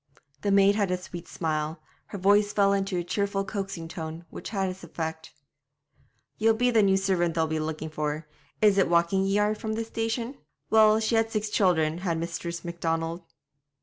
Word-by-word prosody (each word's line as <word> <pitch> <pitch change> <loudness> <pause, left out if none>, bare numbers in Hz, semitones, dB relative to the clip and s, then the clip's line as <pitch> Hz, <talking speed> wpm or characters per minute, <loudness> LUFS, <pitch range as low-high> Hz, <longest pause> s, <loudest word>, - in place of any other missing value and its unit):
The 200 - 0
maid 200 0 +5
had 205 -2 0
a 180 - +1
sweet 175 -1 -9
smile; 155 -1 -2 0.3
her 205 - -6
voice 205 +2 +4
fell 200 -1 +4
into 195 -1 -1
a 175 - -1
cheerful 195 +2 -1
coaxing 195 -4 -4
tone, 165 +1 -7
which - - -7
had 195 -3 -1
its 185 0 -6
effect. 160 -1 -5 1.1
'Ye'll 225 +1 +4
be 245 +2 +2
the 225 -2 +5
new 195 -1 +4
servant 185 -4 +1
they'll 160 -1 +2
be 160 0 -2
looking 155 0 -4
for. 150 0 -3 0.4
Is 205 -2 +5
it 190 - +3
walking 170 +3 +3
ye 195 +1 +1
are 210 +1 +2
from 220 0 -4
the 225 +1 -2
station? 225 +3 -3 0.3
Well, 215 0 +6
she 220 +1 0
had 225 0 +3
six 215 -1 -2
children, 170 -6 +2
had 175 -3 -1
Mistress 170 +1 -4
Macdonald.' 165 0 -2
190 Hz, 185 wpm, -27 LUFS, 165-205 Hz, 1.1 s, Well